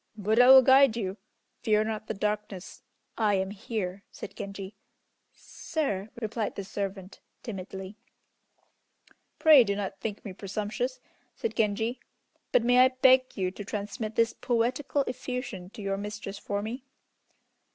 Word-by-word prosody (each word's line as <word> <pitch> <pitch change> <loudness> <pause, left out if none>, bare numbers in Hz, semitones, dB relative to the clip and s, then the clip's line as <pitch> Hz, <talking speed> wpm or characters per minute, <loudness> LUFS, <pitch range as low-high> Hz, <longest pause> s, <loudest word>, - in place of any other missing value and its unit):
"Buddha 220 +4 +4
will 265 0 +10
guide 265 -2 +6
you; 195 -3 -3 0.4
fear 215 -3 +3
not 215 0 -4
the 220 - -3
darkness, 210 -2 -4 0.4
I 210 -2 +3
am 190 0 -1
here," 200 -2 -4
said - - -9
Genji. 200 0 -7 0.6
"Sir!" 215 - -4
replied 220 -1 -3
the 200 - -4
servant, 195 0 -5 0.2
timidly. 190 -1 -7 1.4
"Pray 305 -5 +8
do 200 -2 -1
not 195 -1 -4
think 215 -1 -5
me 195 - -6
presumptuous," 210 +6 -3 0.4
said 460 - -3
Genji; 225 +3 0 0.5
"but 235 - +4
may 245 +1 +4
I 255 - +8
beg 260 0 +4
you 185 -2 0
to 205 - -8
transmit 215 +1 -5
this 230 0 +3
poetical 255 +4 0
effusion 250 -8 -5
to 210 - -10
your 195 0 -1
mistress 205 -1 -6
for 205 0 -3
me? 240 +4 -5
215 Hz, 140 wpm, -28 LUFS, 200-245 Hz, 1.4 s, will